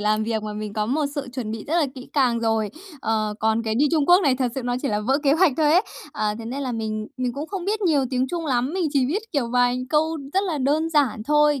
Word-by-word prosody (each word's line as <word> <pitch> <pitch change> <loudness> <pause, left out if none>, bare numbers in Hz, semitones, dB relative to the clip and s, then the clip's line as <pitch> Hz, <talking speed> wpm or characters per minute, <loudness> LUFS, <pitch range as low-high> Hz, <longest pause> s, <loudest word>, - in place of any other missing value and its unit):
làm 215 +1 +1
việc 220 -1 -1
mà, 215 0 -4
mình 210 0 -5
có 210 0 -1
một 290 +6 0
sự 285 -2 -3
chuẩn 245 -4 -4
bị 220 -1 -5
rất 315 - -2
là 325 -4 +3
kỹ 255 -1 -10
càng 250 -5 +2
rồi. 225 -2 0 0.3
Ờ, 215 -3 -1
còn 220 +1 +2
cái 220 -1 -1
đi 295 - +4
Trung 305 -3 +2
Quốc 355 +2 +7
này 275 -6 +3
thật 250 -2 -1
sự 265 - -3
nó 245 0 -1
chỉ 280 - 0
là 210 -1 0
vỡ 265 +7 +1
kế 280 -2 +4
hoạch 330 0 +4
thôi 305 -1 +3
ấy. 360 +4 +5 0.3
Ờ, 210 -7 -1
thế 230 - -7
nên 265 +5 -4
là 255 - -2
mình 215 -1 -3
mình 250 -1 -1
cũng 290 +5 -5
không 385 -2 -5
biết 420 +3 -1
nhiều 310 -8 +2
tiếng 255 0 +1
Trung 335 -2 -3
lắm, 255 +1 0
mình 365 -3 0
chỉ 270 -4 +2
biết, 380 +10 -1
kiểu, 275 -7 0
vài 245 0 +2
câu 315 +1 +1
rất 390 +2 +2
là 335 -6 -2
đơn 300 +5 +1
giản 275 -8 +2
thôi, 295 0 +3
260 Hz, 285 wpm, -23 LUFS, 225-305 Hz, 0.3 s, Quốc